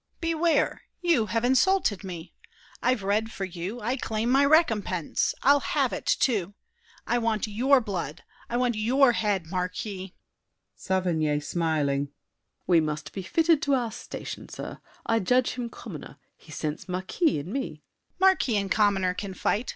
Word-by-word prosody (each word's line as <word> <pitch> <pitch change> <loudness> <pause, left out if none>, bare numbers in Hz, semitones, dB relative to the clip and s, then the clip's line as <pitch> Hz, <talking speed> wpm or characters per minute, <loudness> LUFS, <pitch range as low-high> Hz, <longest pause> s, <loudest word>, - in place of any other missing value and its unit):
Beware! 330 0 +1 0.2
You 310 -11 +3
have 230 +2 0
insulted 260 - +3
me! 175 -4 -7 0.5
I've 250 -4 +1
read 215 +3 0
for 195 - -4
you; 185 +6 -6
I 245 +5 -1
claim 225 0 -1
my 275 +2 +5
recompense! 225 - +2
I'll 285 +1 +6
have - - 0
it, - - -5
too! 205 -6 +1 0.5
I 240 - +1
want 225 -2 0
your 250 +6 +3
blood, 180 - -4 0.3
I 240 - -1
want 245 -1 +2
your 245 +5 +4
head, 205 -6 0
Marquis! 185 +1 -4 0.6
SAVERNY 165 -6 0
(smiling). 145 -3 0 0.6
We 175 -2 +5
must 150 -1 -4
be 195 - -4
fitted 320 - +2
to 280 -3 +2
our 240 -3 -1
station, 235 - -7
sir. - - -7 0.3
I 225 - +2
judge 250 +5 +2
him 245 -2 -4
commoner, - - -9 0.2
he - - -17
scents 155 +3 -4
marquis 185 - 0
In 165 +8 -5
me. 270 -11 -1
DIDIER. 155 -1 -14 0.4
Marquis 375 - +3
and 195 -1 -2
commoner 195 -4 +3
can 190 0 -6
fight. 225 +6 0
215 Hz, 155 wpm, -27 LUFS, 180-255 Hz, 0.6 s, I'll